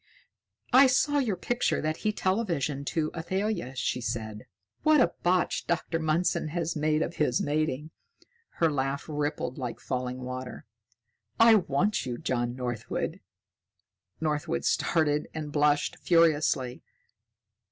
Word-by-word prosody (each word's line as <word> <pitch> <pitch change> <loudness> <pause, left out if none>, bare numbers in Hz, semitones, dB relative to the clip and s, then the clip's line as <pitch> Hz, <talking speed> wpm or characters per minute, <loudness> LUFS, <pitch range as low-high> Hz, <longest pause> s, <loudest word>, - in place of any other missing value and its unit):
"I 265 +2 +8
saw 290 +3 +2
your 230 -8 0
picture 240 +7 0
that 155 +1 -1
he 215 - 0
televisioned 170 - -1
to 155 -2 -1
Athalia," 185 - -2
she 125 -1 -1
said. 110 -2 -4 0.3
"What 310 -1 +5
a 250 - +3
botch 180 0 +1
Dr. 170 -1 -1
Mundson 160 0 0
has 170 +1 -2
made 155 0 +1
of 170 - -5
his 125 -5 +2
mating." 150 0 -1 0.6
Her 165 -2 +2
laugh 135 0 -2
rippled 150 -3 -3
like 125 -3 -4
falling 125 0 -3
water. 130 0 -6 0.7
"I 230 0 +8
want 195 +1 +2
you, 120 -1 -3
John 120 -1 -2
Northwood!" 120 -3 -3 1.0
Northwood 150 - -1
started 150 -2 +1
and 150 -2 -4
blushed 145 0 +2
furiously. 155 -7 +2
155 Hz, 125 wpm, -28 LUFS, 130-175 Hz, 1.0 s, I